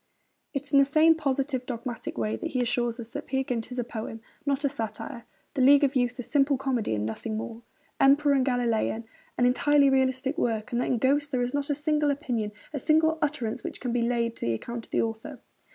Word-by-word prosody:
It 275 -2 -3
is 285 - -12
in 280 - +7
the - - +7
same 310 +3 +5
positive, 275 -4 -1
dogmatic 240 - -5
way 110 -1 -1
that 110 - -4
he 255 - 0
assures 240 0 0
us 230 -1 -8
that - - -6
Peer 265 0 0
Gynt 245 -2 -3
is 250 - -6
a 245 - 0
poem, 225 -1 -6 0.3
not 280 +1 +1
a - - +3
satire; 230 0 -5 0.3
The 265 - -1
League 280 +3 +7
of 280 0 +2
Youth 245 0 +1
a 250 - -4
'simple 280 +1 +2
comedy 255 - -1
and 105 0 -2
nothing 215 - -4
more'; 225 +1 -6 0.4
Emperor 285 +1 +5
and 270 -2 +3
Galilean 235 -3 0 0.3
an 245 - +3
'entirely 280 +2 +4
realistic 265 +3 +1
work'; 220 -6 -1
that 240 +1 0
in 250 - +1
Ghosts 285 +4 +2
'there 255 -4 0
is 245 - -3
not 285 0 -1
a 290 - +1
single 300 0 +1
opinion, 245 -7 -2 0.2
a 290 - -2
single 315 +3 +3
utterance 280 -7 -1
which - - -5
can 245 -3 -3
be 245 - +1
laid 235 -1 0
to - - -3
the 115 - +1
account 235 - -6
of - - -35
the - - +2
author.... 225 +4 -5
255 Hz, 230 wpm, -27 LUFS, 235-280 Hz, 0.4 s, in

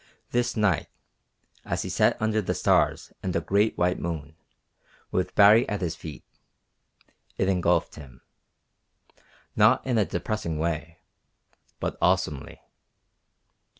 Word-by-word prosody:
This 120 -1 0
night, 105 -6 +1 0.8
as - - -2
he - - -5
sat - - +2
under 110 0 +1
the 95 - -2
stars - - +1
and 95 -2 -3
a - - +3
great 100 +6 +1
white 90 +1 +1
moon, 80 -3 -5 0.8
with 90 0 -1
Baree 110 +4 +6
at 105 -2 -3
his 85 -3 -2
feet, 80 -2 -9 1.1
it 95 - +1
engulfed 90 -2 +1
him; 70 -5 -13 1.3
not - - +4
in 125 -4 +1
a 105 - +3
depressing 85 -3 -3
way, 85 +1 -3 0.8
but - - -4
awesomely. 90 -7 0
90 Hz, 120 wpm, -26 LUFS, 80-105 Hz, 1.3 s, Baree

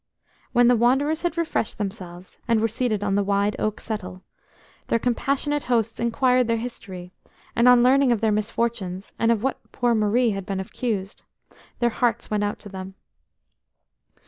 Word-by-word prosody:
When 245 -1 +4
the 245 - +5
wanderers 270 +7 +2
had 345 -1 -2
refreshed 330 -9 -1
themselves, 190 -4 -7
and 230 -2 +3
were 225 - +2
seated 225 -2 -1
on 200 -1 0
the 200 - +3
wide 200 +1 +1
oak 215 -1 -1
settle, 185 -4 -6 0.6
their - - +2
compassionate 275 +5 0
hosts 230 -2 0
inquired 250 +1 +2
their 230 0 +1
history, 190 -6 -7 0.4
and 235 +1 +4
on 250 -1 +7
learning 265 +1 +4
of 235 - +2
their 220 0 +2
misfortunes, 210 -3 -2
and 230 0 +3
of 225 -1 0
what 270 - -1
poor 245 -1 +1
Marie 225 +2 +2
had 195 -1 -4
been 195 -1 -2
accused, 200 0 -4 0.6
their 240 -1 +1
hearts 235 -1 -1
went 210 -1 +1
out 205 0 -2
to 205 - -10
them. 190 0 -8
225 Hz, 170 wpm, -24 LUFS, 205-245 Hz, 0.6 s, on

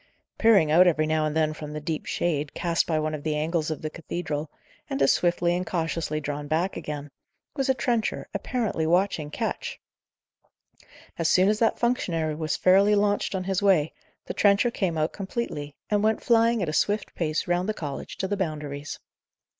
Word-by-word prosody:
Peering 200 -9 +5
out 180 +3 +7
every 155 -3 +3
now 155 0 +1
and 155 +1 -2
then 155 -1 +2
from 150 -1 -8
the 150 - -4
deep 155 0 -4
shade, 150 -4 -1
cast 170 -1 0
by 160 - +1
one 155 0 -1
of 150 - -4
the 155 0 -1
angles 155 +1 -1
of 155 - -4
the 155 - -2
cathedral, 160 -3 -4 0.4
and 135 - -2
as 135 - +5
swiftly 175 0 +1
and 180 0 -3
cautiously 165 -3 -2
drawn 145 0 -4
back 165 +5 0
again, 145 -1 -6 0.4
was 270 -2 -1
a 265 - +4
trencher 235 -2 -1
apparently 220 -11 -1
watching 175 -3 +1
Ketch. - - -4 1.4
As 165 - +2
soon 185 +2 +5
as 210 0 +1
that 225 - +2
functionary 170 -10 0
was 155 0 -2
fairly 195 +3 +5
launched 205 -1 +1
on 185 - -2
his 190 +1 -1
way, 185 -7 +3 0.3
the - - -4
trencher 205 +4 +3
came 180 -7 -1
out 155 +1 0
completely, 190 -8 -4 0.2
and 205 -1 +3
went 220 0 +1
flying 230 -2 +3
at 165 - -2
a - - -3
swift 205 +6 0
pace 155 -2 -1
round 175 +3 0
the - - +1
college 145 -3 -6
to 190 - -2
the 205 - -1
Boundaries. 150 -6 -4
170 Hz, 190 wpm, -26 LUFS, 155-200 Hz, 1.4 s, out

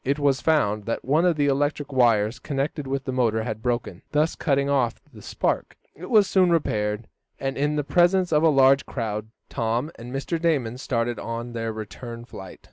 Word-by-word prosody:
It 140 +2 0
was 140 -2 +1
found 110 -10 +1
that 115 - -3
one 150 +6 +3
of 175 -2 +3
the 145 -1 +1
electric 145 +1 0
wires 115 -2 +3
connected 140 0 -3
with 135 0 -2
the 130 - -3
motor 115 -4 +1
had 110 -2 -4
broken, 120 -7 -2
thus 150 +2 +2
cutting 140 -3 +1
off 130 -5 +1
the 105 - -12
spark. - - -2 0.2
It 180 +4 -9
was 215 -4 +6
soon 185 -2 +3
repaired, 105 -9 0 0.3
and, 135 0 -2
in 145 +2 0
the 150 - 0
presence 175 +5 +3
of 150 - +4
a 165 - +5
large 135 -1 +4
crowd, 110 -3 -3 0.2
Tom 120 +6 -2
and 120 +1 -8
Mr. 140 +5 -3
Damon 130 -8 0
started 120 -3 -1
on 115 +1 -5
their 115 -1 -3
return 115 +2 -8
flight. 95 -6 -10
135 Hz, 195 wpm, -24 LUFS, 115-150 Hz, 0.3 s, was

